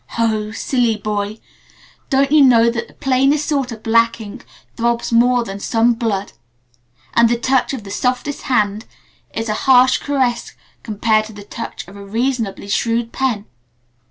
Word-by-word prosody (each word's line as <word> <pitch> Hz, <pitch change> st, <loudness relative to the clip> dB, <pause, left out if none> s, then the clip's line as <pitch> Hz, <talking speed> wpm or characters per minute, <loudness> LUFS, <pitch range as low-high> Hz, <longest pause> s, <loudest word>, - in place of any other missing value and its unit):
Ho! 215 Hz, -2 st, 0 dB
Silly 235 Hz, 0 st, 0 dB
boy! 210 Hz, 0 st, -3 dB, 0.7 s
Don't 275 Hz, +1 st, +2 dB
you 305 Hz, -1 st, +6 dB
know 235 Hz, -3 st, +5 dB
that 235 Hz, 0 st, -4 dB
the -, -, -21 dB
plainest 270 Hz, +3 st, +1 dB
sort 275 Hz, -5 st, -1 dB
of 220 Hz, -1 st, -9 dB
black 230 Hz, +1 st, +2 dB
ink 220 Hz, +3 st, -10 dB, 0.3 s
throbs 235 Hz, 0 st, -1 dB
more 245 Hz, +1 st, +3 dB
than 195 Hz, -2 st, -7 dB
some 230 Hz, +3 st, +2 dB
blood 215 Hz, -4 st, -2 dB, 0.8 s
and 235 Hz, 0 st, +4 dB
the 240 Hz, -, +1 dB
touch 260 Hz, +2 st, +1 dB
of 260 Hz, -6 st, -5 dB
the 195 Hz, -, -9 dB
softest 250 Hz, +6 st, -2 dB
hand 215 Hz, -3 st, 0 dB, 0.5 s
is 225 Hz, 0 st, -4 dB
a 215 Hz, -, 0 dB, 0.2 s
harsh 255 Hz, 0 st, +6 dB
caress 260 Hz, -4 st, -1 dB, 0.3 s
compared 215 Hz, -1 st, +1 dB
to 220 Hz, -, -11 dB
the 205 Hz, 0 st, -10 dB
touch 230 Hz, -1 st, -7 dB
of 195 Hz, -, -13 dB
a 200 Hz, -, -10 dB
reasonably 225 Hz, -1 st, -2 dB
shrewd 230 Hz, +2 st, 0 dB
pen? 240 Hz, -6 st, -1 dB
230 Hz, 160 wpm, -18 LUFS, 215-255 Hz, 0.8 s, you